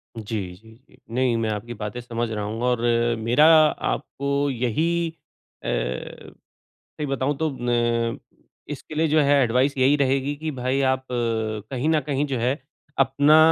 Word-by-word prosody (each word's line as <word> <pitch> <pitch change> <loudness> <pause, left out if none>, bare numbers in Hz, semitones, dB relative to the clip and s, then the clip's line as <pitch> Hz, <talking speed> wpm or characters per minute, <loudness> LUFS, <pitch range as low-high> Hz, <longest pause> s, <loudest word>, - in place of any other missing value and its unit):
जी, 110 -1 -4 0.2
जी, 110 - -16 0.2
जी, - - -21 0.2
नहीं, 125 -1 +2
मैं 115 -1 -1
आपकी 110 +3 -4
बातें 105 +1 -5
समझ 120 -1 -3
रहा 105 -1 -3
हूँ 110 +3 -4
और 125 -2 +1 0.4
मेरा 120 +7 +4 0.2
आपको 140 -1 -2
यही 160 +8 0 0.5
अ, - - -5
सही 60 +1 -5 0.5
बताऊ 135 +1 0
तो 160 +2 0
न 120 -1 0 0.5
इसके 150 +1 -7
लिए 160 +1 +2
जो 155 +1 +4
है 140 -1 +4
एडवाइस 130 +4 +2
यही 135 +3 +4
रहेगी 135 0 +1
कि 155 +2 -4
भाई 130 +2 0
आप 130 0 -8
कहीं 115 +2 -2
न 160 -1 +3
कहीं 145 0 0
जो 135 -3 -2
है 125 +5 0 0.4
अपना 140 +3 +4
130 Hz, 155 wpm, -24 LUFS, 115-140 Hz, 0.5 s, मेरा